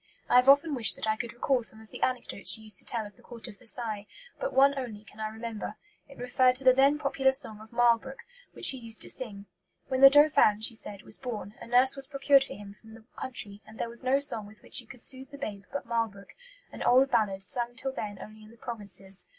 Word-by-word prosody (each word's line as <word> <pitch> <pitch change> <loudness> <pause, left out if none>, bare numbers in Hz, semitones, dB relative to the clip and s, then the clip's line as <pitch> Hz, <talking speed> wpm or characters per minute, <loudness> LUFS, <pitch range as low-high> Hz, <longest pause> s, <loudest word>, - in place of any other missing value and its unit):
I - - +4
have 250 +2 +5
often 285 +3 +5
wished 240 -5 +5
that - - -4
I 215 - +2
could 235 +1 -4
recall 250 +2 0
some 220 -1 -2
of 220 0 -17
the - - -10
anecdotes 245 -5 -2
she 220 - +2
used 215 -3 -2
to - - -8
tell 230 -3 -3
of 205 -2 -13
the - - -20
Court 240 -1 -9
of 205 -4 -12
Versailles, 220 -3 -4 0.3
but - - -2
one 275 +1 +4
only 230 -6 -6
can 215 0 -18
I 215 - -2
remember; 220 -1 -6 0.3
it 275 - -14
referred 250 +1 +2
to 270 - -5
the 255 -1 +7
then 275 +3 +4
popular 275 -2 +1
song 220 -6 0
of 220 - -14
'Marlbrook,' 240 +2 +1 0.3
which - - -4
she 265 - +7
used 230 -2 -1
to - - 0
sing. 205 -6 -7 0.4
'When 260 0 -1
the 275 - +11
Dauphin,' 285 -7 +5
she 225 - +1
said, 210 -3 -9
'was - - -5
born, 215 -6 -6
a - - -9
nurse 250 +2 +5
was 275 -1 -3
procured 275 -1 +3
for - - -9
him 200 0 -12
from 220 0 -14
the 225 -1 -16
country, 210 -5 -7
and 220 +1 -14
there 235 - -3
was 235 0 -6
no 260 +2 +3
song 275 -7 -1
with 210 +1 -17
which - - -18
she 245 -5 +1
could 250 -1 -11
soothe 260 0 -2
the 280 - -11
babe 205 -8 -6
but 280 - -4
'Marlbrook,' 225 -4 -3 0.4
an - - -10
old 260 +2 +4
ballad, 200 -5 +1
sung 240 +4 -3
till 265 +2 -2
then 205 -5 -5
only 215 0 -11
in 215 - -15
the 230 - -17
provinces. 200 -5 -4
235 Hz, 250 wpm, -28 LUFS, 215-265 Hz, 0.4 s, the